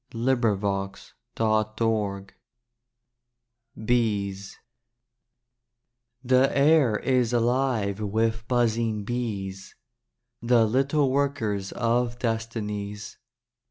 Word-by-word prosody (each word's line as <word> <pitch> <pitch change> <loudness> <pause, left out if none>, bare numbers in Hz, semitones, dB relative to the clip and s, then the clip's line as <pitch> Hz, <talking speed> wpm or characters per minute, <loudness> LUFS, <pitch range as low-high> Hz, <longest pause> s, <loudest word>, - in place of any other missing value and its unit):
FH3] 105 -5 -1 0.2
DAY 110 -1 0
DREAMS 105 -4 -1 1.5
BEES 100 -5 -1 1.7
The 130 +2 +3
air 140 -6 +4
is 125 -2 +1
alive 120 -4 0
with 110 +2 -1
buzzing 115 -3 0
bees 100 -5 -4 0.7
The 120 -1 +4
little 135 +4 +1
workers 130 -9 -1
of 120 0 0
destinies. 110 -3 -4
115 Hz, 70 wpm, -25 LUFS, 105-125 Hz, 1.7 s, air